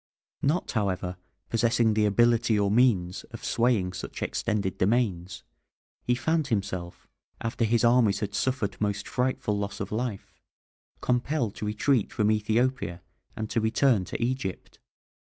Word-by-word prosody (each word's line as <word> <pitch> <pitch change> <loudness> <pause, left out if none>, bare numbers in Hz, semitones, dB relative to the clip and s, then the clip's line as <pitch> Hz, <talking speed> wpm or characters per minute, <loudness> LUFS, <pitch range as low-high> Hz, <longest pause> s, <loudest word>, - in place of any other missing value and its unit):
Not, 155 +6 0
however, 95 -5 -1 0.3
possessing 115 -1 +3
the 105 0 +2
ability 115 +1 +3
or 100 -1 +2
means 105 -7 +2
of - - -10
swaying 115 -7 +1
such 90 - -6
extended 105 -4 -2
domains, 95 -4 0 0.6
he 125 - +1
found 160 +3 0
himself, 95 -6 -3 0.3
after 115 0 -1
his 115 +2 +2
armies 115 -4 +4
had 105 -1 -3
suffered 115 -7 -1
most 105 -1 -1
frightful 125 -5 -1
loss 100 0 -4
of 100 - -4
life, 110 -2 -4 0.6
compelled 125 -2 0
to 105 - -3
retreat 110 +2 +1
from 105 0 +2
Ethiopia 110 -4 0 0.3
and 110 - -3
to 115 - +1
return 110 -1 +3
to - - -5
Egypt. 120 -6 -3
110 Hz, 135 wpm, -27 LUFS, 100-120 Hz, 0.6 s, armies